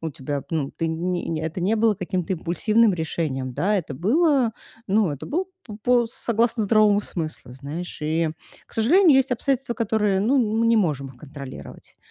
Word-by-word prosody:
У 165 - -3
тебя, 140 0 -5
ну, 150 -4 -1
ты 165 - -3
не 175 +2 -2
не 160 -1 -2
это 165 +3 -4
не 200 +5 +2
было 225 -1 +3
каким-то 185 0 -2
импульсивным 210 +6 +2
решением, 150 -6 -3
да. 205 +3 +1
Это 155 -7 -3
было 255 - +2 0.3
ну, 200 -3 +2
это 145 - -6
был 355 +5 -1 0.2
п 210 -2 -8
по 245 -1 +3
согласно 235 -1 0
здоровому 210 0 +4
смыслу. 155 -10 -6
Знаешь, 150 +6 -7
и, 160 +1 0 0.4
к - - -23
сожалению, 300 - +5
есть 265 -1 +2
обстоятельства, 250 0 -1
которые, 210 -4 +1
ну, 260 +7 +3
мы 225 -1 +1
не 230 - +4
можем 150 -9 0
их 130 - -14
контролировать. 140 -1 -11
195 Hz, 180 wpm, -23 LUFS, 160-230 Hz, 0.4 s, сожалению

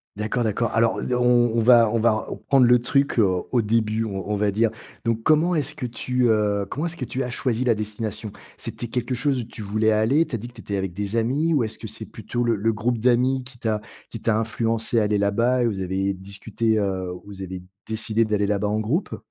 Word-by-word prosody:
D'accord, 110 +4 -1
d'accord. 115 +1 0
Alors 115 0 +2
d - - -4
heu, 125 - +2
on 120 -1 +3
on - - +3
va 115 -2 +6
on 115 - 0
va 115 +1 +4
r 110 - -4
prendre 135 -3 +5
le 125 0 +6
truc, 140 +4 +1
heu, 115 - +6 0.3
au 125 - +3
début, 110 0 +1
on 100 -1 -5
on 105 - +1
va 105 0 +1
dire. 110 +3 +2 0.4
Donc 115 -1 0
comment 160 +5 +3
est-ce 145 -2 -1
que 125 - -4
tu, 125 +1 -1
heu, 105 -2 +1
comment 150 +5 -3
est-ce 170 0 -4
que 135 - -4
tu 130 +2 -3
as 125 - -4
choisi 125 -1 -1
la 120 -2 +3
destination? 105 0 -4 0.2
C'était - - -6
quelque 125 +1 -2
chose 135 +1 +1
où - - -5
tu 110 -1 -9
voulais 110 +2 +1
aller? 120 +10 +3
Tu 145 - -3
as - - -1
dit 120 +3 -8
que - - -19
tu - - -12
étais 100 - -3
avec 95 -2 -3
des 100 +3 -3
amis, 140 +8 +1
ou 135 - +2
est-ce 110 -1 -5
que - - -7
c'est - - -4
plutôt 120 0 -3
le 115 -1 +2
le 110 +2 +1
groupe 115 +2 -1
d'amis 125 +2 +2
qui 125 -1 -13
t'a 110 -3 -1 0.3
qui - - -7
t'a 110 -2 +2
influencée 115 +1 0
à - - +2
aller 105 0 +1
là-bas 115 +5 +2
et - - +2
vous 105 -4 -1
avez 95 +1 -1
discuté, 100 +4 -2
heu, 95 -3 -1
vous 100 -1 -9
avez 95 -1 -6 0.2
décidé 110 0 +1
d'aller 105 -2 0
là-bas 105 0 0
en 105 +1 0
groupe? 130 - -1
115 Hz, 250 wpm, -23 LUFS, 105-125 Hz, 0.4 s, va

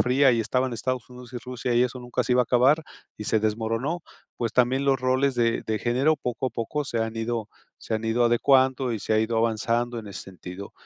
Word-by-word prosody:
Fría 130 +2 +4
y 115 - +2
estaban 130 +2 0
Estados 125 +1 -3
Unidos 125 0 -12
y 120 - -4
Rusia 125 0 -3
y 120 - +5
eso 125 0 -1
nunca 125 0 -2
se 125 - 0
iba 125 0 +5
a - - -3
acabar 130 +7 +3 0.3
y 105 - -7
se 110 - +1
desmoronó, 115 +9 -1 0.3
pues 115 -1 -2
también 130 +2 +2
los 135 -2 +2
roles 130 +1 +2
de 115 -1 +1
de 110 -1 0
género 135 +6 +2
poco 125 -1 -3
a - - -2
poco 145 +6 -3
se 120 -3 -3
han 110 0 -2
ido 115 -1 -2 0.3
se 110 - -4
han 110 +1 -2
ido 115 +2 +2
adecuando 130 +1 +3
y 110 - -3
se 110 - 0
ha 110 - +4
ido 110 +1 0
avanzando 115 +1 0
en 110 - -8
ese 100 -3 -7
sentido. 95 +1 -9
120 Hz, 230 wpm, -25 LUFS, 115-130 Hz, 0.3 s, y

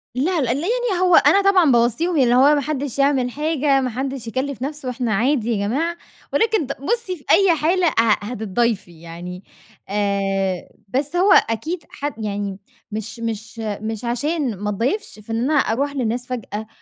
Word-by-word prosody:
لا 320 +6 +1
لأ 245 -3 +1
ال 250 - 0
يعني 440 - 0
هو 360 -2 +5
أنا 395 - +6
طبعًا 380 -6 +4
باوصِّيهم 245 +9 +2
اللي 245 -3 +4
هو 280 +4 +6
ما 290 - +1
حدش 280 -2 -3
يعمل 275 -3 +2
حاجة 295 -1 +1
ما 255 - -1
حدش 260 0 -4
يكلِّف 260 +2 -3
نفسه 280 -1 -4
إحنا 245 -2 -2
عادي 240 +2 +1
يا 200 -2 0
جماعة، 330 +9 -1 0.4
ولكن 440 - +2
ت 275 - -6
بُصي 415 +3 -1
في 290 - -20
أي 390 -4 +5
حالة 340 +4 +2
ه - - +3 0.3
هتتضايفي 210 -5 -2
يعني، 175 +2 -8 0.5
آآ، 195 -2 -1 0.2
بس 275 - -2
هو 375 +3 +4
أكيد 310 +10 +1
ح 285 - -7
يعني 200 -2 -4 0.3
مش 220 +2 -5
مش 225 0 -5
مش 220 +1 -4
عشان 260 +1 -1
ما 205 +2 -3
اتضايفش 245 - -2
فإن 225 +2 -4
أنا - - +2
أروح 280 0 +1
للناس 245 -1 -2
فجأة 220 -3 -5
250 Hz, 170 wpm, -21 LUFS, 220-305 Hz, 0.5 s, أنا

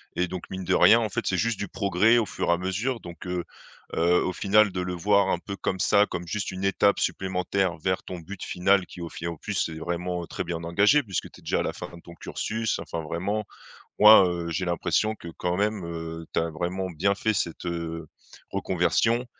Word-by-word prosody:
et 90 - +1
donc, 90 0 -7
mine 95 0 -4
de - - 0
rien, 115 - +7
en 110 -2 -1
fait, - - -3
c'est 95 - +1
juste 115 0 0
du 100 - -3
progrès, 105 +5 +3
au 110 - +1
fur - - -3
et - - +6
à 85 - +1
mesure. 105 +7 -2
Donc, 85 -2 -10
heu, 90 -1 -2 0.5
heu, 85 +2 +3
au 95 - -1
final, 100 +2 +3
de 90 - -4
le 90 0 -2
voir 100 +2 +3
un 85 - +1
peu 100 +2 -6
comme 95 0 -2
ça, 100 +3 +4
comme 90 -3 -6
juste 105 +1 -2
une 95 0 -6
étape 100 +1 +3
supplémentaire 95 -1 -1
vers 95 +3 -1
ton 90 -1 -7
but 95 +3 -8
final, 95 +1 +2
qui 90 - -11
au 85 - -5
fi 85 - -8
au 85 -2 -3
plus, - - -5
c'est 80 - 0
vraiment 85 +1 -3
très - - -4
bien 85 -1 -4
engagé 105 - +4
puisque 95 -7 -3
tu - - -16
es - - -23
déjà - - 0
à - - -1
la - - -2
fin - - -7
de 85 - -13
ton 85 - -12
cursus 110 +5 -2
enfin 85 - -5
vraiment. 95 +7 -2 0.6
Moi, 105 -2 +9
heu, 85 -1 -3
j'ai 90 +3 -1
l'impression 85 +4 0
que, 85 - -10
quand 90 0 -1
même, 105 -2 0
heu, 80 -1 -6
tu - - +3
as 80 0 -1
vraiment 90 +3 -3
bien 95 +4 +1
fait 110 +1 0
cette, 85 -2 -2
heu, 85 -1 -4 0.4
reconversion 120 +2 +1
90 Hz, 230 wpm, -26 LUFS, 85-100 Hz, 0.6 s, Moi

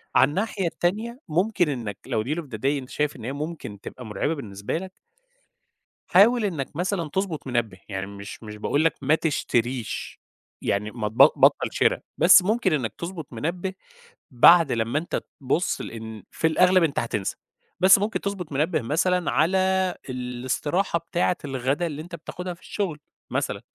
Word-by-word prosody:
عن 130 - +6
الناحية 195 +3 -1
التانية 215 +9 -2
ممكن 180 +1 +1
إنّك 115 -8 -4
لو 115 -5 -1
deal 150 +7 -2
of - - -1
the 130 -7 -8
day - - -7
أنت 135 -2 0
شايف 150 0 -1
إن 115 - -9
هي 130 - -3
ممكن 145 -8 -6
تبقى 125 - -9
مُرعبة 110 +9 -1
بالنسبة 105 -5 -4
لك 190 +2 -7 1.1
حاول 220 +5 +5
إنّك 155 -9 -3
مثلًا 175 -3 -1
تضبط 180 -7 -3
منبّه، 115 -6 -1
يعني 95 -1 -3
مش 100 +2 -9
مش 105 -1 -8
باقول 145 +8 +1
لك 165 - +3
ما 145 +3 +4
تشتريش، 125 -7 -2 0.4
يعني 105 +1 -1
ما 110 -3 -3
تب 110 - -16 0.2
بطّل - - +4
شرا، - - +2 0.2
بس 185 +2 +8
ممكن 215 -1 +1
إنّك 120 -8 -1
تضبط 170 -5 -6
منبّه 175 +9 -3 0.6
بعد 160 +4 +7
لمّا 115 +5 0
أنت 170 - -3 0.2
تبص 140 +7 0
لإن 110 -3 -8
في 160 - +1
الأغلب 180 +2 +4
أنت 155 -4 +1
هتسنى، 105 -4 -3 0.4
بس 190 +2 +7
ممكن 210 +2 -1
تضبط 195 -5 -4
منبّه 150 +5 +1
مثلًا 175 +8 +1
على 170 +5 +3 0.5
الاستراحة 130 +8 -1
بتاعة 175 +2 0
الغدا 135 +4 -1
اللي 150 -1 -5
أنت 170 +2 -8
بتاخدها 180 +1 -6
في 170 - -19
الشغل، 175 -8 -3 0.3
مثلًا، - - -2
150 Hz, 165 wpm, -25 LUFS, 120-180 Hz, 1.1 s, بس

